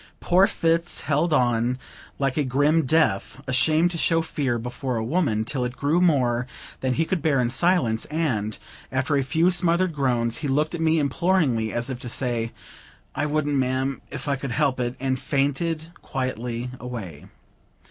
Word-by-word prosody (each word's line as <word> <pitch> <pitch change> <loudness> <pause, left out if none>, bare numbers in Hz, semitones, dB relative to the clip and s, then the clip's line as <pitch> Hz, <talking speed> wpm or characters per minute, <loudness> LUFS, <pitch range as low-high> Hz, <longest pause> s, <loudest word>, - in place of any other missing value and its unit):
Poor 185 +3 +4
Fitz 165 +1 0
held 150 +5 +1
on 120 -3 +2 0.4
like 135 -2 0
a 150 - +1
grim 145 +3 +2
Death, 130 -6 +1
ashamed 155 +6 +3
to 170 - -4
show 165 0 +2
fear 135 -6 -1
before 125 +2 -4
a 110 - -1
woman, 120 -5 +1
till 130 +1 -2
it 125 0 -3
grew 155 +7 +1
more 125 -8 +2 0.3
than 130 -1 0
he 165 - +1
could 180 0 -1
bear 150 -3 +2
in 120 -1 +1
silence; 140 -9 +2
and, 125 -10 -1 0.3
after 135 +3 0
a 140 - +3
few 160 +7 +2
smothered 175 0 +2
groans, 120 -5 0
he 145 - -3
looked 150 +4 +1
at 170 - -3
me 160 0 +3
imploringly, 140 - +1
as 120 +3 -2
if 125 -1 -6
he 125 - -6
said, 120 -2 -1 0.6
"I 150 - -1
wouldn't, 145 -1 0
ma'am, 130 +1 0
if - - -7
I 140 -1 +1
could 135 -2 -4
help 140 -3 +1
it," 120 0 -1
and 130 0 -1
fainted 150 +4 -1
quietly 125 -2 -3
away. 110 -12 -7
135 Hz, 175 wpm, -24 LUFS, 125-160 Hz, 0.6 s, Poor